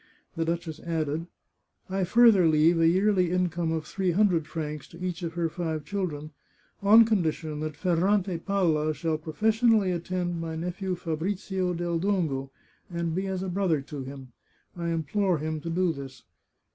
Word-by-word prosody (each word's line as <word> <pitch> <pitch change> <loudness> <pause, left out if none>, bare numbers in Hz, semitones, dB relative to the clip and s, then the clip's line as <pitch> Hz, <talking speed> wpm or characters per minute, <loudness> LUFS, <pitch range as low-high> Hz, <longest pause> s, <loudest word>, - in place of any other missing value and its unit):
The 165 - -1
duchess 165 -1 -3
added: 160 -1 -2 0.3
" - - -50 0.3
I 190 -1 0
further 215 -3 +6
leave 160 +2 +4
a 165 - +5
yearly 185 0 +3
income 175 -2 0
of 160 -1 -2
three 190 +2 -1
hundred 175 -4 +2
francs 150 -2 -5
to 170 - -14
each 180 -1 -3
of 165 -2 -4
her 170 -1 0
five 160 -2 -3
children, 160 -7 -3 0.5
on 220 +3 +7
condition 160 -7 -1
that 155 -1 -4
Ferrante 185 +1 +1
Palla 165 -6 +1
shall 160 -1 -1
professionally 215 +5 +2
attend 175 0 -2
my 165 -1 -4
nephew 180 +3 -3
Fabrizio 180 +2 -2
del 170 -1 -1
Dongo, 165 -9 0 0.4
and 170 -2 -2
be 190 +3 -1
as 190 -1 -2
a - - -3
brother 180 -4 +1
to 140 0 -7
him 135 -1 -9 0.2
— - - -39
I 170 -1 -4
implore 170 +3 0
him 155 +1 -3
to 165 - -5
do 175 0 +1
this 135 -2 -9
170 Hz, 170 wpm, -27 LUFS, 160-185 Hz, 0.5 s, on